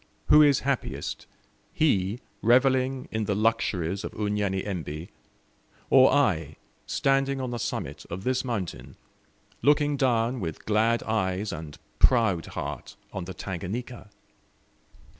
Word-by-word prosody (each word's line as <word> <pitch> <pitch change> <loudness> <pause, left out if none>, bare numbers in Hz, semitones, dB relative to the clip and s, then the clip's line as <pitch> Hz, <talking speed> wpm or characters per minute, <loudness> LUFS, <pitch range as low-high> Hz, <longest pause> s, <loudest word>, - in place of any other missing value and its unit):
Who 150 - +8
is 145 -3 +5
happiest 135 -1 -3 0.4
he 105 -7 +1 0.2
revelling 130 +2 +3
in 110 -1 -1
the 100 - 0
luxuries 100 -4 0
of - - -6
Unyanyembe, 95 -6 -2 0.8
or 130 -1 +7
I, 80 - +1 0.3
standing 135 0 +1
on 130 -2 -3
the 120 - -3
summit - - -4
of 90 +3 -6
this 130 +2 0
mountain, 110 -9 -4 0.7
looking 145 0 +3
down 125 -1 +1
with 80 -6 -5
glad 110 +2 +2
eyes 100 -2 -1
and 75 -3 -8 0.2
proud 110 -10 +3
heart - - -6 0.2
on 95 - -4
the 95 - -7
Tanganika? 105 +7 -6
110 Hz, 120 wpm, -27 LUFS, 95-130 Hz, 0.8 s, Who